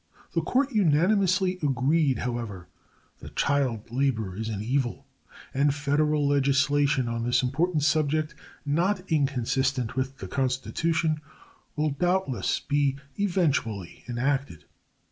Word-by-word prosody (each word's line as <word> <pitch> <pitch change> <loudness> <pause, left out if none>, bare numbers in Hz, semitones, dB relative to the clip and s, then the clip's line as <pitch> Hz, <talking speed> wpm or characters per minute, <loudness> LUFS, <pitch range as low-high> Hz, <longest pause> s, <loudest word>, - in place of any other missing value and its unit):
The - - +1
Court 275 +2 +1
unanimously 185 - +2
agreed, 140 +1 +2
however, 115 -7 -4 0.5
that - - -11
child 130 -6 0
labor 120 -7 0
is 110 +2 -4
an 105 -3 -3
evil, 125 +1 -1 0.5
and 140 +1 +2
Federal 145 +1 +1
legislation 140 -1 +2
on 115 0 -2
this 125 +1 +2
important 155 +4 0
subject 155 0 +1 0.3
not 180 +6 +1
inconsistent 135 -3 0
with 130 +1 -2
the - - -7
Constitution 155 +4 0 0.5
will 150 0 0
doubtless 175 -2 0
be 140 -2 +1 0.2
eventually 145 - -1
enacted. 125 - -2
140 Hz, 110 wpm, -26 LUFS, 125-155 Hz, 0.5 s, unanimously